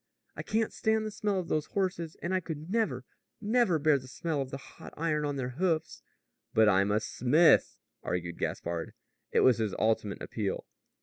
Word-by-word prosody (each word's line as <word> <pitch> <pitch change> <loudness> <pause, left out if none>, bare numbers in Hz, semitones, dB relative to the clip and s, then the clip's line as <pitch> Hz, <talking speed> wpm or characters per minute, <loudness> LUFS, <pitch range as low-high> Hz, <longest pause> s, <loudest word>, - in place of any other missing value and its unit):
"I - - -4
can't 220 0 -1
stand 220 0 +1
the 215 - -3
smell 205 -2 -1
of 175 - -4
those 155 -1 0
horses, 180 -4 -1
and 175 - -1
I 185 - +3
could 160 -1 -7
never, 155 - 0 0.3
never 220 -5 +2
bear 150 -1 +3
the 130 - -13
smell 150 +2 -2
of 135 - -4
the 135 - -5
hot 140 - -13
iron 155 -2 0
on 145 -1 -2
their 130 -2 -2
hoofs." 160 -4 0 0.5
"But 110 0 +6
I'm 100 0 +4
a 105 +1 +3
smith," 140 +9 +4 0.2
argued 85 -1 -3
Gaspard. 85 -1 -3 0.4
It - - +3
was 125 -3 +5
his 110 -4 -1
ultimate 110 -2 0
appeal. 105 -4 -3
150 Hz, 185 wpm, -30 LUFS, 115-185 Hz, 0.5 s, But